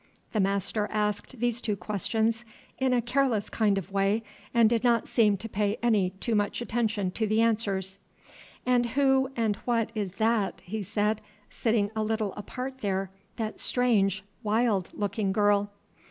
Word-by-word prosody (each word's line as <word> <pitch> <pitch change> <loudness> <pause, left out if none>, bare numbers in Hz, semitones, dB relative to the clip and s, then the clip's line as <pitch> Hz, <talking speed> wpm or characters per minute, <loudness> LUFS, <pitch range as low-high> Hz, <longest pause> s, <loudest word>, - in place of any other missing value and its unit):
The 215 - +1
master 200 +2 +1
asked 210 +3 -2
these 240 0 0
two 215 -4 -1
questions 220 +4 -1 0.4
in 260 -1 +2
a 245 -2 +2
careless 240 -4 +1
kind 210 -3 +2
of 195 0 -5
way, 200 +3 +1 0.3
and 235 -2 +5
did 230 0 +1
not 235 -2 +3
seem 210 -4 +3
to 225 - -6
pay 210 0 0
any 210 -6 +3
too 195 +5 -3
much 205 -1 +1
attention 220 -5 -1
to 220 +3 -1
the 215 +1 +2
answers. 200 -4 +1 0.7
"And 245 -1 +3
who 265 -1 +4
and 220 -3 0
what 230 -2 0
is 205 -5 -3
that," 220 -1 +1
he 215 +4 -4
said, 210 +2 0 0.3
"sitting 220 -3 +1
a 220 - 0
little 215 -2 -1
apart 255 +5 -6
there, 195 -3 -1 0.2
that 220 -1 -4
strange, 210 -6 +2 0.2
wild 215 -3 +1
looking 205 -1 -1
girl?" 205 0 +3
215 Hz, 160 wpm, -28 LUFS, 200-235 Hz, 0.7 s, and